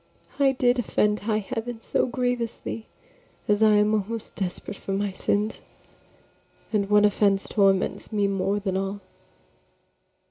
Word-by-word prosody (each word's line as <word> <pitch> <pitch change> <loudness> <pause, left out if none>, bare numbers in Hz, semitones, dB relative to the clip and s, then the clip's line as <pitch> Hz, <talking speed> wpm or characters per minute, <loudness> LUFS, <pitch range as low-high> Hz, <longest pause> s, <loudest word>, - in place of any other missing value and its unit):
I 275 -1 +4
did 250 -1 +2
offend 210 -2 +1
high 215 0 0
heaven 225 +3 -4
so 225 - 0
grievously 240 -2 -3 0.6
As 210 0 +2
I 215 -1 +6
am 210 +1 +3
almost 215 +2 -3
desperate 195 +1 -4
for 195 - -5
my 200 0 -1
sins; 205 +3 -1 1.1
And 200 -2 +1
one 210 0 +5
offense 200 -1 +2
torments 195 0 +1
me 205 -2 +1
more 195 +1 0
than 190 -2 -2
all. 195 +1 -3
210 Hz, 135 wpm, -25 LUFS, 200-225 Hz, 1.1 s, I